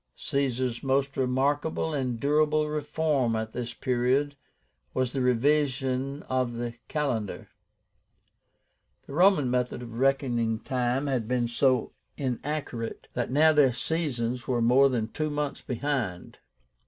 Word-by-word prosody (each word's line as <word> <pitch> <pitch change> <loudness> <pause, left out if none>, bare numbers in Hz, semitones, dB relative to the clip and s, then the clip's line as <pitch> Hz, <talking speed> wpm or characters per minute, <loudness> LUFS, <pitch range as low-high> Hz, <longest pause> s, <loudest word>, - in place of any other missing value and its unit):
Caesar's 130 -3 -1
most 135 0 0
remarkable 140 +5 0
and 130 -5 -2
durable 150 +2 +2
reform 150 -5 0
at 110 0 -3
this 120 0 -5
period 130 +3 +1 0.6
was 130 -1 0
the 135 - -1
REVISION 135 +1 +1
OF 130 -2 -1
THE 120 0 -4
CALENDAR. 125 -9 -2 1.6
The - - -10
Roman 175 -6 +4
method 125 0 -1
of 115 -1 -7
reckoning 125 -5 +1
time 125 +2 -1
had 130 -6 -1
been 125 -1 +1
so 125 +1 +1 0.2
inaccurate, 130 -3 -4
that 120 - -2
now 155 +4 +5
their 140 -4 +5
seasons 125 -4 -2
were 125 -2 +1
more 125 +4 +5
than 115 -4 -1
two 155 +4 -2
months 145 -1 -3
behind. 125 -8 -3
130 Hz, 125 wpm, -27 LUFS, 120-145 Hz, 1.6 s, now